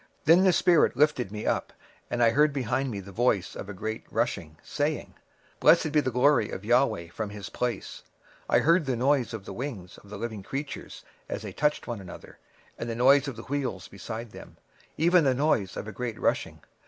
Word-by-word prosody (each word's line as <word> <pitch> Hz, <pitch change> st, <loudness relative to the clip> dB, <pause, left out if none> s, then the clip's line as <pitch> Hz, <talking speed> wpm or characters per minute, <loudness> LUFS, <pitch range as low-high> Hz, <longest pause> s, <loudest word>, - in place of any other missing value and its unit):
26:003:012 -, -, -37 dB
Then 165 Hz, +4 st, +6 dB
the 185 Hz, -, +5 dB
spirit 155 Hz, -5 st, +4 dB
took 120 Hz, -6 st, -4 dB
me 105 Hz, 0 st, -5 dB
up, -, -, -1 dB, 0.4 s
and 120 Hz, 0 st, +1 dB
I 115 Hz, -, +5 dB
heard 150 Hz, +4 st, +4 dB
behind 130 Hz, 0 st, -1 dB
me 110 Hz, -, -4 dB
a 100 Hz, -, -10 dB
voice 105 Hz, -4 st, 0 dB
of 100 Hz, -, -7 dB
a -, -, -5 dB
great 110 Hz, +3 st, -4 dB
rushing, 75 Hz, -1 st, -2 dB
saying, 150 Hz, +1 st, -2 dB, 0.5 s
Blessed 155 Hz, -, +5 dB
be 150 Hz, 0 st, +3 dB
the 130 Hz, -, -1 dB
glory 125 Hz, -2 st, +3 dB
of -, -, -6 dB
the 105 Hz, -, -8 dB
LORD 110 Hz, -9 st, +2 dB
from 110 Hz, -2 st, -4 dB
his 100 Hz, -2 st, -8 dB
place. 120 Hz, -5 st, -3 dB, 0.5 s
26:003:013 -, -, +3 dB
I -, -, +7 dB
heard 170 Hz, +4 st, +5 dB
also 135 Hz, -4 st, -2 dB
the -, -, 0 dB
noise 130 Hz, -1 st, +1 dB
of 100 Hz, -3 st, -9 dB
the -, -, -7 dB
wings 110 Hz, -6 st, -6 dB
of 100 Hz, -, -18 dB
the 105 Hz, -, -7 dB
living 110 Hz, -1 st, -5 dB
creatures 140 Hz, +8 st, -6 dB, 0.2 s
that -, -, -6 dB
touched 150 Hz, 0 st, 0 dB
one 120 Hz, -4 st, -5 dB
another, 90 Hz, -2 st, -12 dB, 0.4 s
and -, -, -4 dB
the 115 Hz, -, -3 dB
noise 135 Hz, +4 st, +5 dB
of 135 Hz, -, -4 dB
the 115 Hz, -, -9 dB
wheels 130 Hz, -10 st, -3 dB
over -, -, -15 dB
against 110 Hz, +3 st, -7 dB
them, -, -, -12 dB, 0.4 s
and 170 Hz, -1 st, +4 dB
a 130 Hz, -, +3 dB
noise 125 Hz, -9 st, +1 dB
of -, -, -5 dB
a -, -, -5 dB
great 115 Hz, +2 st, -5 dB
rushing. -, -, -1 dB
120 Hz, 220 wpm, -27 LUFS, 105-145 Hz, 0.5 s, I